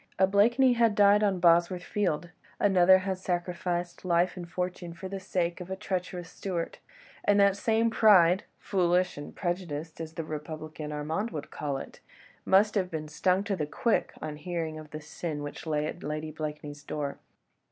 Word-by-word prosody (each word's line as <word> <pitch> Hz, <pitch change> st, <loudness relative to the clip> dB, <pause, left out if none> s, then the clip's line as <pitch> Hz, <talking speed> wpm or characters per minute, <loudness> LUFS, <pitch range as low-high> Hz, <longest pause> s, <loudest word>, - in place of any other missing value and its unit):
A 190 Hz, -, +5 dB
Blakeney 235 Hz, +7 st, +4 dB
had 230 Hz, -3 st, +3 dB
died 205 Hz, 0 st, +6 dB
on 200 Hz, -3 st, +2 dB
Bosworth 175 Hz, +1 st, +4 dB
Field, 175 Hz, -5 st, -1 dB, 0.3 s
another 190 Hz, -2 st, +6 dB
had 190 Hz, -1 st, -2 dB
sacrificed 175 Hz, -1 st, -2 dB
life 175 Hz, 0 st, +2 dB
and 175 Hz, -2 st, -7 dB
fortune 180 Hz, -1 st, -4 dB
for 190 Hz, +3 st, -7 dB
the 195 Hz, +1 st, -5 dB
sake 180 Hz, -2 st, -2 dB
of 180 Hz, -, -8 dB
a 190 Hz, -, -2 dB
treacherous 180 Hz, -2 st, -4 dB
Stuart: 175 Hz, -4 st, -4 dB, 0.4 s
and 205 Hz, 0 st, +4 dB
that 200 Hz, -1 st, +5 dB
same 225 Hz, +2 st, +1 dB
pride—foolish 180 Hz, -2 st, +3 dB
and 145 Hz, -, -9 dB
prejudiced 170 Hz, -4 st, -4 dB
as 160 Hz, 0 st, -6 dB
the 165 Hz, -, -4 dB
republican 155 Hz, 0 st, -6 dB
Armand 155 Hz, +9 st, -2 dB
would 150 Hz, -9 st, -7 dB
call 140 Hz, -2 st, -3 dB
it—must 195 Hz, +8 st, -1 dB
have 190 Hz, -4 st, 0 dB
been 155 Hz, -2 st, -5 dB
stung 185 Hz, +5 st, +1 dB
to 205 Hz, -1 st, -1 dB
the 150 Hz, -5 st, -2 dB
quick 230 Hz, +8 st, 0 dB
on 155 Hz, -1 st, -5 dB
hearing 160 Hz, -1 st, -4 dB
of 155 Hz, -1 st, -11 dB
the 155 Hz, 0 st, -7 dB
sin 150 Hz, -1 st, -5 dB
which 145 Hz, +3 st, -7 dB
lay 150 Hz, -1 st, 0 dB
at 165 Hz, +3 st, -5 dB
Lady 155 Hz, +1 st, -4 dB
Blakeney's 150 Hz, -1 st, -6 dB
door. 145 Hz, -2 st, -4 dB
175 Hz, 170 wpm, -29 LUFS, 155-190 Hz, 0.4 s, died